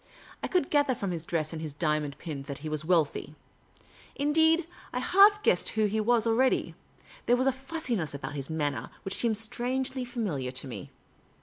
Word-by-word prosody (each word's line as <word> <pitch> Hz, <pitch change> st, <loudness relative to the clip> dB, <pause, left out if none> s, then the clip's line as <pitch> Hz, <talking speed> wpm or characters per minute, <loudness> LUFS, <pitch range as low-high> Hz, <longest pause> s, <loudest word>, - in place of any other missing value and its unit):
I -, -, -2 dB
could 360 Hz, -6 st, 0 dB
gather 290 Hz, -3 st, +3 dB
from 200 Hz, -4 st, -3 dB
his 170 Hz, -2 st, -4 dB
dress 155 Hz, -2 st, -1 dB
and 160 Hz, -, -5 dB
his 155 Hz, -3 st, -5 dB
diamond 150 Hz, -2 st, -1 dB
pin 150 Hz, -5 st, -6 dB
that 140 Hz, -, -4 dB
he -, -, -2 dB
was 155 Hz, 0 st, -2 dB
wealthy. 155 Hz, -3 st, +1 dB, 0.8 s
Indeed, 320 Hz, +3 st, +3 dB, 0.3 s
I -, -, -3 dB
half 400 Hz, +10 st, +5 dB
guessed -, -, +3 dB
who 220 Hz, -1 st, +1 dB
he 215 Hz, +1 st, 0 dB
was 230 Hz, +1 st, +2 dB
already. 240 Hz, +3 st, +2 dB, 0.5 s
There 245 Hz, -, +5 dB
was 255 Hz, -, +1 dB
a 270 Hz, -, +4 dB
fussiness 255 Hz, -, -3 dB
about 140 Hz, +1 st, -5 dB
his 140 Hz, -1 st, -5 dB
manner 145 Hz, -3 st, -2 dB, 0.2 s
which 195 Hz, -, -2 dB
seemed 225 Hz, -3 st, +2 dB
strangely 255 Hz, +4 st, -1 dB
familiar 205 Hz, -, -3 dB
to 130 Hz, +2 st, -4 dB
me. 105 Hz, -7 st, -7 dB
215 Hz, 185 wpm, -29 LUFS, -, 0.8 s, half